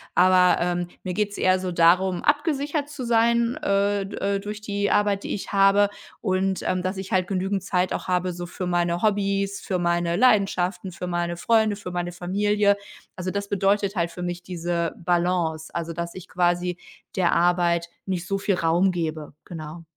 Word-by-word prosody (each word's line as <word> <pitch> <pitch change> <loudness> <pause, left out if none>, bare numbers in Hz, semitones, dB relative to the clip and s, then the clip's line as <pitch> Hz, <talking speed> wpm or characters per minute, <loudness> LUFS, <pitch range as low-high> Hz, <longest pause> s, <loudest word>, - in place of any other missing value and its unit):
Aber, 185 0 +5
ähm, 175 0 -1 0.2
mir 180 - -3
geht 210 +1 0
es - - -8
eher 185 0 +3
so 185 -1 -3
darum, 175 +2 +3
abgesichert 295 -1 0
zu 285 -4 -6
sein, 235 +1 +2
äh, 200 0 +1
d 195 - -7
äh, 200 0 0
durch 210 +1 -6
die 205 -1 -1
Arbeit, 205 -1 +2
die - - -3
ich 200 - -7
habe 200 +1 +5 0.3
und, 190 -2 0
ähm, 185 -1 0
dass 185 +2 -3
ich 190 0 -6
halt 185 -1 +2
genügend 195 0 -1
Zeit 185 -1 0
auch - - -4
habe 180 0 0
so 175 0 -6
für 180 +1 -5
meine 175 0 0
Hobbys, 200 -1 0
für 185 - -2
meine 170 0 0
Leidenschaften, 195 -5 +2
für 180 +1 -6
meine 175 -1 -2
Freunde, 220 +1 +2
für 190 -3 -7
meine 175 0 -3
Familie. 200 +3 +1 0.4
Also, 185 0 -4
das 200 +1 -3
bedeutet 200 +1 +1
halt 170 -1 0
für 180 - -7
mich 175 0 -3
diese 170 -2 -2
Balance, 170 -2 0
also, 170 -1 -3
dass 170 +1 -5
ich 185 0 -9
quasi 175 0 0 0.4
der 180 -3 +2
Arbeit 170 -1 +2 0.2
nicht 180 -2 -3
so 195 - 0
viel 195 -1 +1
Raum 175 +3 +2
gebe, 155 -4 -4
genau. 165 0 -8
185 Hz, 185 wpm, -24 LUFS, 175-200 Hz, 0.4 s, Aber